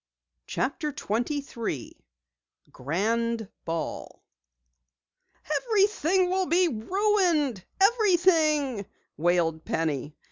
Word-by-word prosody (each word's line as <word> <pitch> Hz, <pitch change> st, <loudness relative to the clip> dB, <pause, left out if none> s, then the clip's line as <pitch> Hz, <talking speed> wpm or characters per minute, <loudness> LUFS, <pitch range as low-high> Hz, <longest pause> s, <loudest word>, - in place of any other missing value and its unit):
CHAPTER 290 Hz, +3 st, -2 dB
23 240 Hz, -, -3 dB, 0.8 s
GRAND 220 Hz, -, -1 dB, 0.2 s
BALL 165 Hz, 0 st, -5 dB, 1.3 s
"Everything 390 Hz, -4 st, +2 dB
will 370 Hz, 0 st, 0 dB
be 355 Hz, +2 st, +3 dB
ruined 335 Hz, -, +1 dB, 0.2 s
everything!" 335 Hz, -, +3 dB, 0.3 s
wailed 165 Hz, -1 st, +1 dB
Penny. 150 Hz, -2 st, -2 dB
280 Hz, 65 wpm, -27 LUFS, -, 1.3 s, be